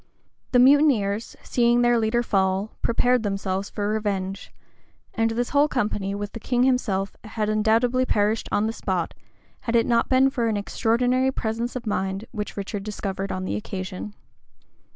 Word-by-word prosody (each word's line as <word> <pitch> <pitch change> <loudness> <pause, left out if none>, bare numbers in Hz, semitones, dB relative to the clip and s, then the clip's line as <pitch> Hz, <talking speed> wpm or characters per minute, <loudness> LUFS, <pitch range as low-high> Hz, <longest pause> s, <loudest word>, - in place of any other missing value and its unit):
The 250 - +4
mutineers, 245 -6 +4
seeing 240 0 +2
their 240 -1 +4
leader 225 +2 +1
fall, 195 0 0
prepared 245 +1 +2
themselves 195 -1 -2
for 205 -1 -3
revenge; 200 -3 -2 0.6
and 225 0 +1
this 235 +2 -1
whole 290 +1 +4
company, 210 -7 -1
with 205 0 -5
the 230 - -7
king 245 +2 +1
himself, 215 -7 0
had 215 -1 -3
undoubtedly 230 +4 +2
perished 210 +2 +1
on 205 - +2
the 225 - -1
spot, 185 -6 -2 0.5
had 235 - -2
it 230 -1 +4
not 235 -1 +2
been 265 +1 +4
for 240 -4 0
an 220 -2 0
extraordinary 245 +5 +1
presence 230 0 -3
of 250 - -5
mind 195 0 -2
which 210 -3 -5
Richard 200 +1 -4
discovered 195 -1 -4
on 185 0 -3
the - - -2
occasion. 195 -1 -6
220 Hz, 160 wpm, -24 LUFS, 200-240 Hz, 0.6 s, The